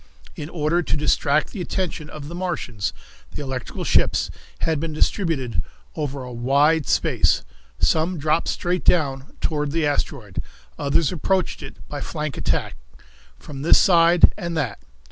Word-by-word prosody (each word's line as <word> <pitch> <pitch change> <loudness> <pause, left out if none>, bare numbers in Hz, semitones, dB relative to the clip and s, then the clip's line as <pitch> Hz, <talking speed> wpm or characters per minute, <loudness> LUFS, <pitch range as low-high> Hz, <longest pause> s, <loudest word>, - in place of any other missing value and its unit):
In 150 0 -6
order 165 +1 +1
to 155 - -1
distract 150 0 +2
the 200 - -5
attention 175 -4 -3
of 145 -2 -8
the 165 - -7
Martians, 170 - -2 0.4
the 145 - -6
electrical 130 -3 -4
ships - - +2 0.3
had 160 -2 +1
been 160 0 -3
distributed 150 - 0 0.3
over 140 -3 -3
a 125 -1 -7
wide 140 +6 +3
space. - - +2 0.3
Some 165 +3 +2
dropped 155 +2 +1
straight 180 0 -1
down 135 -5 +1
toward 150 -2 0
the 160 0 +1
asteroid; 135 - -2 0.3
others 140 - +1
approached 185 +2 0
it - - -11
by 145 -1 -5
flank 150 -1 -4
attack, - - -1 0.6
from 140 -2 -9
this 160 - +6
side 170 -2 +6
and 170 -3 -3
that. 140 -7 -2
150 Hz, 145 wpm, -23 LUFS, 140-170 Hz, 0.6 s, this